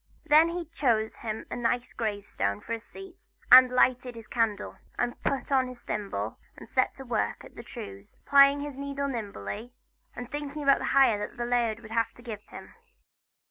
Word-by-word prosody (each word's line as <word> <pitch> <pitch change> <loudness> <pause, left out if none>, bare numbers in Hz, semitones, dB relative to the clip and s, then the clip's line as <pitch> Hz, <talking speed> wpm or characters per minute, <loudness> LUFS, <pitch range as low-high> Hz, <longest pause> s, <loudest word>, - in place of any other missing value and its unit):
Then 310 +3 +6
he 345 0 -4
chose 240 -9 0
him 220 -1 -5
a - - -2
nice 245 +1 -1
grave 205 -3 -3
stone 100 - -2
for 230 - -6
a 230 - -2
seat 385 - -13 0.3
and 255 +1 +11
he 250 - -10
lighted 250 -1 +2
his 230 -1 -10
candle, 215 -2 -1 0.2
and 245 0 -2
put 275 +1 -2
on 260 -2 +3
his 250 -1 -10
thimble, 195 - -4 0.2
and - - -11
set - - +1
to - - -10
work - - -2
at - - -14
the - - -8
trews, 100 0 -10
plying 280 0 +6
his 290 -1 -6
needle 280 0 -3
nimbly, 220 - -6 0.4
and 245 0 -7
thinking 290 0 -5
about 275 -1 +5
the - - -3
hire 245 -6 +5
that - - -20
the 240 - -2
laird 235 -2 0
would 220 -1 -12
have 230 0 0
to 240 - -16
give 220 -4 -6
him. - - -11
245 Hz, 200 wpm, -28 LUFS, 220-275 Hz, 0.4 s, and